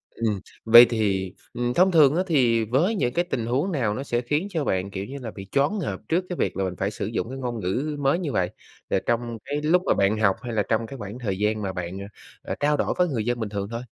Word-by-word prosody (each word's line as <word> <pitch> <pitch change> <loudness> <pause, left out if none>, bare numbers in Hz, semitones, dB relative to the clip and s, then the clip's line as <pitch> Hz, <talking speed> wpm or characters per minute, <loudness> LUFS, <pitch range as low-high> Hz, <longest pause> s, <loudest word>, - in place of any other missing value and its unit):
Ừm, 110 -4 -1 0.3
vậy 120 +2 +10
thì, 100 -5 0 0.2
ừm, 120 0 -1
thông 185 +2 +4
thường 155 -3 +6
á 185 - +2
thì 120 -8 +3
với 160 - +1
những 125 -10 0
cái 175 +1 +1
tình 120 -10 -2
huống 140 +11 0
nào 120 -9 0
nó 135 - -4
sẽ 120 -3 -1
khiến 150 +10 -1
cho 160 -6 -2
bạn, 95 +1 -1
kiểu 95 0 -4
như 140 +3 -7
là, 115 -3 -5
bị 95 -1 -10
choáng 145 +10 +1
ngợp - - -3
trước 180 +3 +1
cái 180 - -3
việc - - -1
là 95 - 0
mình 90 -1 -3
phải 100 +3 -2
sử 100 - -4
dụng 115 +2 -3
cái 135 - -6
ngôn 120 -3 -3
ngữ 130 +12 -2
mới 140 +5 +2
như 155 -6 -3
vậy, 90 -1 0 0.4
rồi 95 - +1
trong 120 -1 -1
cái 145 +1 -2
lúc 170 +4 +3
mà - - +3
bạn 100 +2 +2
học 95 -3 +3
hay 120 -2 -5
là 105 -2 +1
trong 115 0 +1
cái 135 - -8
khoảng 105 +3 -7
thời 100 -6 -2
gian 105 +1 0
mà 95 -2 -3
bạn, 90 +1 -5
ờ, 100 - -6 0.4
ờ, - - -4
trao 150 0 +2
đổi - - 0
có 180 - +3
người 120 -9 -2
dân 120 0 -1
bình 110 -2 -3
thường 100 -1 -3
thôi? 115 +1 -4
120 Hz, 280 wpm, -25 LUFS, 105-145 Hz, 0.4 s, vậy